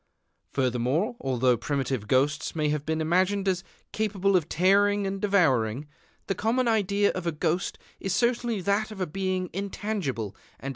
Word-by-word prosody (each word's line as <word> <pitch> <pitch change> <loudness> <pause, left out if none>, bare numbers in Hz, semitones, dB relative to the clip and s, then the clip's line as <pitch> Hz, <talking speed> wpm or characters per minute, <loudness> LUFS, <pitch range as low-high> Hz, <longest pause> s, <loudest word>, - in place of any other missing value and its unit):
Furthermore, 130 - 0
although 130 -2 +2
primitive 130 -3 -2
ghosts 140 +6 +1
may 155 -2 +1
have 150 0 -2
been 160 0 0
imagined 185 +5 +1
as 185 -1 +1 0.3
capable 200 -2 +1
of 165 -4 +1
tearing 200 +3 +3
and 195 0 -3
devouring, 140 - +2 0.4
the - - -1
common 230 +6 0
idea 205 -2 +2
of 185 -2 -4
a - - +2
ghost 165 +4 -1 0.2
is 195 - -3
certainly 235 -2 +1
that 200 +4 +1
of 215 -3 -9
a 185 - 0
being 185 +2 -2
intangible 195 - -3
and - - -18
imponderable. - - -29
185 Hz, 160 wpm, -27 LUFS, 145-200 Hz, 0.4 s, tearing